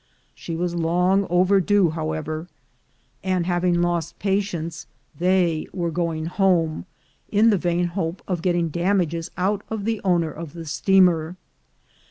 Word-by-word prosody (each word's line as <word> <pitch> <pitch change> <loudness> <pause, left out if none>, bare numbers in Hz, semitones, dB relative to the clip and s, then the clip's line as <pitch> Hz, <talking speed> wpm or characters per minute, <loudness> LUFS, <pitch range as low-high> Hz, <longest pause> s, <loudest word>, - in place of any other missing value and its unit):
She 165 - -6
was 175 +1 -2
long 180 +3 +2
overdue, 185 0 +3
however, 155 0 -4 0.8
and 185 -2 0
having 175 -1 +1
lost 170 -1 -1
patience, 190 -5 -2 0.3
they 175 -3 +2
were 170 -3 -2
going 165 -2 -2
home, 175 -2 +1 0.4
in 220 +2 +4
the 205 - +3
vain 175 0 0
hope 175 -1 -3
of 180 -3 -2
getting 175 -2 +1
damages 170 -1 0
out 195 +3 0
of 220 -2 -4
the 225 -1 -1
owner 175 -4 +1
of 160 -2 -8
the 165 -1 -8
steamer. 175 0 +3
175 Hz, 135 wpm, -23 LUFS, 165-190 Hz, 0.8 s, in